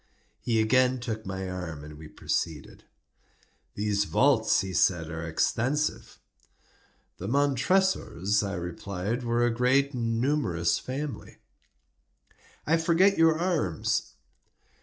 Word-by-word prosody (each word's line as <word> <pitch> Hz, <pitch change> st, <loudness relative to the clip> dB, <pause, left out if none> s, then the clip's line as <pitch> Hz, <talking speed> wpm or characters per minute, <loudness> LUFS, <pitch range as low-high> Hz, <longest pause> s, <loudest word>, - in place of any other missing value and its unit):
He 115 Hz, -2 st, 0 dB
again 125 Hz, +3 st, +3 dB
took 110 Hz, -3 st, -5 dB
my 95 Hz, 0 st, -4 dB
arm, 90 Hz, -5 st, -6 dB
and 75 Hz, 0 st, -10 dB
we 80 Hz, +1 st, -11 dB
proceeded. 75 Hz, -1 st, -4 dB, 0.9 s
"These 105 Hz, 0 st, 0 dB
vaults," 130 Hz, -1 st, +3 dB
he 95 Hz, -1 st, -5 dB
said, 80 Hz, -1 st, +1 dB
"are 80 Hz, 0 st, -5 dB
extensive." 130 Hz, -, -1 dB, 1.0 s
"The 95 Hz, -, -5 dB
Montresors," 140 Hz, -, +1 dB
I 100 Hz, -1 st, -3 dB
replied, 90 Hz, +6 st, -4 dB
"were 120 Hz, 0 st, +1 dB
a 120 Hz, -, +1 dB
great 130 Hz, +4 st, +2 dB
and 115 Hz, -2 st, -1 dB
numerous 115 Hz, -, +1 dB
family." 135 Hz, -2 st, -6 dB, 1.3 s
"I 165 Hz, +2 st, +3 dB
forget 170 Hz, +4 st, +3 dB
your 160 Hz, -1 st, +5 dB
arms." 165 Hz, -, -1 dB
115 Hz, 115 wpm, -27 LUFS, 95-140 Hz, 1.3 s, your